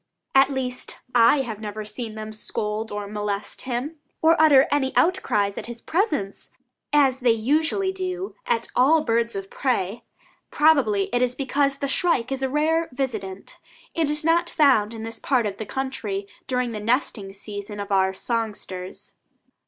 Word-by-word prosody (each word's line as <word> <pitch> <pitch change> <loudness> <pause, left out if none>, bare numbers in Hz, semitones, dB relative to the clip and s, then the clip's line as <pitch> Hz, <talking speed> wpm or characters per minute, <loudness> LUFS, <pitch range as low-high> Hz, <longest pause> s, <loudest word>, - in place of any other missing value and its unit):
At 270 0 +6
least, 255 -2 -4 0.2
I 245 +4 +6
have 225 -5 -5
never 215 0 -5
seen 220 +1 -6
them 215 0 -6
scold 215 0 -4
or 205 0 -4
molest 205 0 -4
him, 260 +7 -3 0.2
or 325 +1 +5
utter 285 -4 +7
any 265 -2 +1
outcries 210 - +2
at - - -8
his 235 -1 -7
presence, 300 - -1 0.4
as 275 -3 +4
they 250 -2 +2
usually 310 - +1
do 370 0 -4
at 480 -2 0 0.4
birds 230 -1 +1
of 195 0 -6
prey. 235 -5 -1 0.5
Probably 275 -10 +4
it 245 - +2
is 250 0 +1
because 275 0 0
the 280 - -2
shrike 275 -4 +1
is 270 0 -2
a 265 - 0
rare 320 +4 +1
visitant, 215 -8 -5 0.4
and 320 -3 +1
is 300 +1 -1
not 340 +1 +3
found 235 -8 +3
in 220 - -7
this 225 0 -6
part 255 -5 +1
of 200 -1 -3
the 220 - -6
country 215 -7 -3 0.2
during 250 -2 0
the 215 - -4
nesting 215 -3 -1
season 205 +1 -7
of 200 0 -5
our 190 -1 +3
songsters. 205 -5 -4
245 Hz, 160 wpm, -24 LUFS, 210-285 Hz, 0.5 s, utter